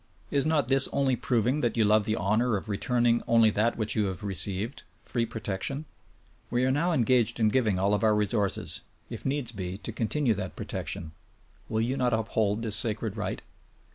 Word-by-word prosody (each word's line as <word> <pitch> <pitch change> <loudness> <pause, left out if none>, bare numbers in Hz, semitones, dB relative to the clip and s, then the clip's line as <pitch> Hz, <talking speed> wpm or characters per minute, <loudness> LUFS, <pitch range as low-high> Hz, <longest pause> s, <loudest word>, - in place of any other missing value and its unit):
Is 140 +1 +1
not 155 -4 +1
this 135 +1 +5
only 135 -2 +1
proving 125 +4 0
that 120 -1 -1
you 110 - +3
love 105 0 +3
the 110 - -1
honor 110 +4 0
of 100 - -9
returning 120 +3 +1
only 115 -2 +4
that 110 +3 0
which 110 -1 0
you 105 -2 +1
have 95 +2 -5
received 100 +4 0
— - - -37
free 115 -2 -2
protection? 110 +7 -4 0.6
We 120 +1 0
are 130 - +1
now 165 +6 0
engaged 120 -6 +1
in 110 -1 +3
giving 110 -5 +1
all 100 +2 +1
of 105 - 0
our 110 -1 +3
resources, 105 -1 0 0.3
if - - -5
needs 135 -3 0
be, 95 -3 -6
to 100 - -6
continue 120 +2 -1
that 95 -2 -6
protection: 80 -2 -5 0.6
Will 110 0 -1
you 125 +4 -2
not 125 -2 0
uphold 110 -1 -1
this 110 -2 +8
sacred 110 -2 +5
right? 100 -4 -5
110 Hz, 195 wpm, -27 LUFS, 105-125 Hz, 0.6 s, this